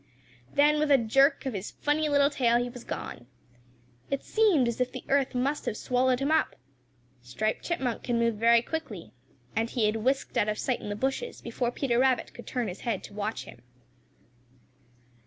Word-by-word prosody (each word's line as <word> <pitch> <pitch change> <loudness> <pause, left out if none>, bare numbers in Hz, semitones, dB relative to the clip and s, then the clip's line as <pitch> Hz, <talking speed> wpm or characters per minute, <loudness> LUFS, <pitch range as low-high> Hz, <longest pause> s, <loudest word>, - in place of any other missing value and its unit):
Then 300 +1 +4
with 305 0 +1
a 280 - +7
jerk 270 +6 +3
of 265 - -2
his 200 0 -4
funny 300 +1 0
little 285 0 +4
tail 240 -4 +3
he 245 0 -1
was 245 -1 -10
gone. 120 - -6 0.8
It 275 - -2
seemed 395 - +3
as 235 +1 -2
if 250 - 0
the - - -7
earth 275 -2 +2
must 275 +4 -1
have 215 - -1
swallowed 250 0 +1
him 275 +3 0
up. 315 0 +2 0.7
Striped 170 - -2
Chipmunk 265 -9 -2
can 240 -1 -1
move 230 0 +2
very 230 +2 +4
quickly, 215 - -6 0.4
and 225 +1 0
he 235 -3 0
had 215 +1 +1
whisked 265 +5 0
out 210 - +2
of 210 - -1
sight 255 - -1
in - - -6
the 205 - -2
bushes 270 - -2
before 235 +1 -2
Peter 245 -1 0
Rabbit 260 -1 +2
could 240 - -11
turn 245 -3 -2
his 185 0 -6
head 225 -5 -2
to - - -10
watch 210 +2 -3
him. - - -13
245 Hz, 195 wpm, -28 LUFS, 225-275 Hz, 0.8 s, a